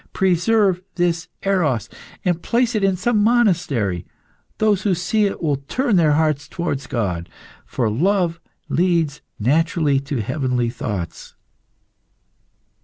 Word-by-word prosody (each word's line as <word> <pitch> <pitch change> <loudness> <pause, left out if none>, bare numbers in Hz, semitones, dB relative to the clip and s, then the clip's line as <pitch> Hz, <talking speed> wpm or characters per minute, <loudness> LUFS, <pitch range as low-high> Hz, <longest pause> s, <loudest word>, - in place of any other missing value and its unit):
Preserve 190 +1 +2
this 175 -1 0 0.2
Eros, 155 - +1 0.4
and 175 -2 +1
place 240 +5 +1
it 215 -3 0
in 195 -1 +2
some 210 +2 +2
monastery. 175 - +2 0.5
Those 210 -3 +2
who 195 -4 +1
see 210 +5 +1
it 195 - -3
will 145 -3 +1
turn 250 - +1
their 160 -4 +4
hearts 150 -2 +1
towards 145 -6 -3
God, 90 -9 -2 0.4
for 120 - -1
love 170 - +1 0.3
leads 165 -4 +1 0.2
naturally 150 +3 +2
to 140 -1 -4
heavenly 125 -2 -1
thoughts." 100 -8 -5
170 Hz, 120 wpm, -21 LUFS, 135-195 Hz, 0.5 s, their